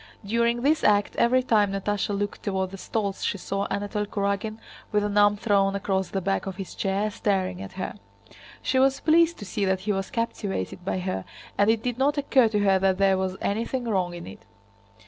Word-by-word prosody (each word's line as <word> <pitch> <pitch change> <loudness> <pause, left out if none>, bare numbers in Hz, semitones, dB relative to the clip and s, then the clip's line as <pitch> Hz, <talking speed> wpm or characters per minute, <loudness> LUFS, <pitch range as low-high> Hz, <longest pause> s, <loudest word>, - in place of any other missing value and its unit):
During 235 +3 +1
this 310 +3 +2
act 205 -1 +3
every 255 +2 +3
time 210 -5 +3
Natásha 200 0 -1
looked 205 0 -3
toward 190 -2 -2
the 195 - -7
stalls 200 -1 -3
she - - 0
saw 195 +1 -2
Anatole 205 +1 -2
Kurágin 200 +2 -2 0.3
with 210 -1 +2
an 205 0 -2
arm 205 0 +5
thrown 200 -2 +2
across 190 -1 -1
the 195 - -2
back 195 +1 -1
of 190 - -4
his 195 -1 -7
chair, 200 +2 -1
staring 190 -3 -1
at 195 -1 -8
her. 185 - -4 0.7
She 260 - +2
was 270 +1 +3
pleased 335 +1 +4
to 205 - -8
see 200 +2 -2
that 190 -1 +1
he 210 +2 -1
was 195 -1 -3
captivated 205 - -3
by 185 - -1
her 180 - -3 0.3
and 205 +1 +3
it 225 0 +2
did 245 0 -2
not 290 +2 +2
occur 270 -4 +4
to 210 -2 0
her 195 -1 +4
that 190 -1 +2
there 195 -1 +4
was 190 0 -2
anything 230 +5 -1
wrong 185 -5 0
in 170 - -8
it. 95 - -11
205 Hz, 205 wpm, -26 LUFS, 195-225 Hz, 0.7 s, arm